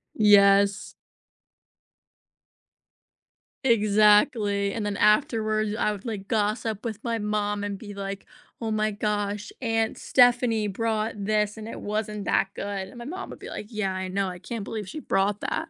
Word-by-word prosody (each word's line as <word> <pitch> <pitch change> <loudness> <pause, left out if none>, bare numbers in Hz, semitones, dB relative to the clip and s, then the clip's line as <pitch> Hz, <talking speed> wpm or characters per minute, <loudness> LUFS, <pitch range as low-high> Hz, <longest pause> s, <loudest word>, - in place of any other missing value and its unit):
Yes. 200 -1 +5 2.7
Exactly, 210 -2 +3
and 220 -2 -3
then 205 -1 -2
afterwards, 215 -3 +2
I 210 -1 +1
would, 200 -1 -9
like, 205 -4 -5
gossip 215 0 -1
with 225 -4 -5
my 230 -1 -1
mom 205 -1 -1
and 205 -1 -3
be 205 0 -9
like, 200 0 -6 0.3
"Oh 225 -2 -3
my 215 0 +1
gosh, 205 0 -2
aunt 225 -2 0
Stephanie 240 -3 +3
brought 220 +2 -1
this, 210 0 +1
and 220 -1 -8
it - - -7
wasn't 210 -1 -3
that 195 - +2
good." 195 -1 -4
And 245 - -13
my 240 - -8
mom 360 +8 -6
would - - -10
be - - -9
like, 210 - -6
"Yeah, 215 -4 -2
I 185 0 -4
know, 195 +1 -1
I 180 -1 -6
can't 225 +1 -6
believe 210 -4 -5
she 310 - -6
brought 200 -6 0
that." 325 - -3
210 Hz, 160 wpm, -26 LUFS, 200-220 Hz, 2.7 s, Yes